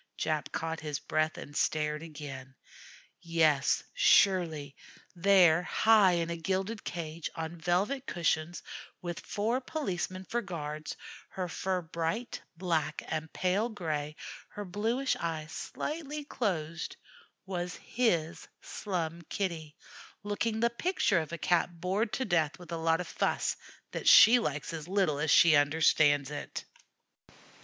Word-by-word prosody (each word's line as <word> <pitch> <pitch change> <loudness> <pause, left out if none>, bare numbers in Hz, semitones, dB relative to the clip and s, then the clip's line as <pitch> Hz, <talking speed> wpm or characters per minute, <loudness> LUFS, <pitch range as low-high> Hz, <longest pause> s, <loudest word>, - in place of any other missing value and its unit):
Jap 155 -1 -1
caught 160 0 -3
his 150 -2 -3
breath 155 +2 -1
and 145 - -9
stared 150 0 0
again. 140 -5 -8 0.7
Yes, 160 -4 +2
surely; 175 - +3 0.4
there, 175 -2 +5
high 205 +1 +4
in 170 -1 0
a - - -2
gilded 190 +6 -2
cage, 165 -1 -5
on 165 +1 -5
velvet 205 +11 0
cushions, 170 -1 -1 0.4
with 175 -1 -4
four 230 +5 -1
policemen 190 - -3
for 240 +6 -1
guards, 155 -6 -5 0.3
her 185 -1 -4
fur 185 +1 -2
bright 165 +9 -3 0.2
black 160 -4 -1
and 160 0 -3
pale 195 +5 0
gray, 155 -7 -3 0.3
her 205 - -7
bluish 225 +8 0
eyes 160 -2 -4
slightly 300 - -5
closed, 180 - -3 0.5
was 180 -2 -3
his 175 -10 -1
Slum 170 -4 -4
Kitty, 165 -6 -3 0.5
looking 215 +2 -1
the 235 0 +3
picture 235 - +1
of 155 -1 -5
a 170 - -3
Cat 175 0 +1
bored 195 +6 0
to 260 - -1
death 160 -6 +1
with 175 -1 -12
a - - -1
lot 165 +1 +2
of 180 - -6
fuss - - 0 0.4
that - - -4
she 245 +2 +9
likes 150 -6 -3
as 160 -1 -6
little 185 -6 +1
as 150 +1 0
she 170 -1 +7
understands 145 -1 +4
it. 145 - -6
170 Hz, 135 wpm, -30 LUFS, 155-200 Hz, 0.7 s, she